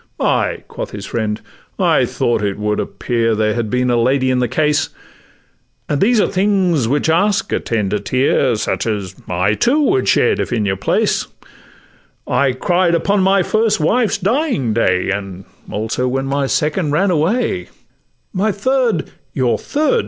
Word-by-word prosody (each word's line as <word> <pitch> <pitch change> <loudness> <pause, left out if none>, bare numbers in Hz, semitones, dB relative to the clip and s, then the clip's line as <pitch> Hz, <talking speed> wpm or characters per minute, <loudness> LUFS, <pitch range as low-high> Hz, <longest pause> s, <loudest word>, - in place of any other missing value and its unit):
'Ay,' - - 0
quoth - - -6
his 100 -1 -7
friend, 110 -2 -3 0.4
'I - - +3
thought 120 -2 0
it 100 -1 -2
would 105 0 -1
appear 115 -2 -1
That 110 - 0
there 110 0 +1
had 115 -2 -2
been 125 +2 +1
a 120 -1 +2
lady 130 +1 +2
in 130 - +1
the 125 - +1
case; 150 +3 +1 1.0
And 145 -1 -1
these 230 +3 +4
are - - +3
things 185 - +1
which 145 +6 0
ask 200 +7 +1
a - - +1
tender 105 -3 -1
tear, 130 +4 +1
Such 105 - -2
as 100 -4 -3 0.2
I, 90 +3 +1
too, 250 - +2
would 390 +7 +2
shed 450 - +3
if - - -2
in 110 -4 0
your 95 -1 0
place: 95 - 0 1.0
I 130 +2 +2
cried 175 +6 +1
upon 200 +4 +1
my 190 0 +3
first 220 +3 +1
wife's 215 +8 +1
dying 205 - 0
day, 95 -4 +1
And 95 -2 -5 0.2
also 110 +4 -2
when 135 +1 -1
my 140 0 -1
second 150 +3 0
ran 185 +7 +2
away: 165 - 0 0.6
'My 205 +3 +1
third 235 - 0 0.2
'—'Your 125 -3 +1
third! 310 +11 +1
140 Hz, 165 wpm, -17 LUFS, -, 1.0 s, these